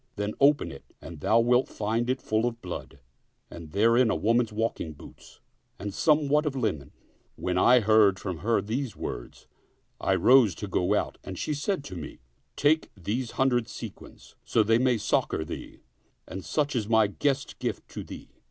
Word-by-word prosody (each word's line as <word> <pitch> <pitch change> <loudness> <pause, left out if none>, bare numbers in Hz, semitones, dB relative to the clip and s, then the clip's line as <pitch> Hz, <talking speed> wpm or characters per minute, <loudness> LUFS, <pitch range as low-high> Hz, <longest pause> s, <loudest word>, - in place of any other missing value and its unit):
Then 105 0 -3
open 145 +1 +4
it 70 - -14
and 80 -2 -10
thou 110 +9 +3
wilt 125 +2 +3
find 115 +3 -2
it 130 0 -1
full 110 +2 +1
of 115 -1 -4
blood, 90 -7 -7 0.5
and 85 -2 -9
therein 115 +5 +4
a - - +1
woman's 115 +1 +1
walking 105 -7 -2
boots 75 - -15 0.4
and 100 0 -5
somewhat 150 +3 +2
of 140 - -2
linen." 100 - -2 0.4
When 90 - -2
I 120 +7 +5
heard 105 -2 +4
from 95 -4 -5
her 115 0 +1
these 120 +4 -3
words, - - -7 0.5
I - - +1
rose 120 -8 +5
to 105 - -6
go 90 -2 +1
out - - -2
and - - -7
she 150 - -2
said 145 +3 -2
to 95 - -8
me, 80 -4 -8 0.2
" - - -43
Take 155 +2 +2
these 115 +7 -3
hundred 125 -3 +2
sequins, - - -10
so 110 - +2
they 115 +2 +3
may 125 -1 +2
succor 105 -6 0
thee; - - -8 0.5
and 95 0 -7
such 150 -2 -1
is 110 -3 -1
my 110 -1 +5
guest 135 +7 -2
gift - - -4
to - - -7
thee." - - -11
115 Hz, 180 wpm, -27 LUFS, 100-130 Hz, 0.5 s, I